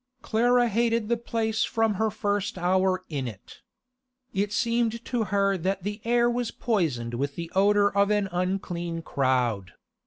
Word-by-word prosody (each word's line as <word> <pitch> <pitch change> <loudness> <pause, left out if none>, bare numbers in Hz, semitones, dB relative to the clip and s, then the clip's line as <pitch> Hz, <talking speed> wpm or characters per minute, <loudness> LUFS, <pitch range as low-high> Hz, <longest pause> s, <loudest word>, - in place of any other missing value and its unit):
Clara 240 +2 +3
hated 230 0 +1
the 235 - +3
place 225 -1 -1
from 225 -1 +1
her 220 +3 0
first 205 -2 -2
hour 185 +1 +1
in 140 -5 -3
it. 105 -5 -11 0.7
It 200 0 0
seemed 230 0 0
to 240 -3 -1
her 195 -1 +1
that 190 +2 -2
the 205 +2 -4
air 240 +1 +3
was 240 -1 -1
poisoned 150 - -1
with 140 +4 -2
the 170 -1 -6
odour 205 +1 +3
of 200 0 +3
an 205 -1 +1
unclean 175 -2 -2
crowd. 125 - 0
200 Hz, 155 wpm, -26 LUFS, 175-225 Hz, 0.7 s, Clara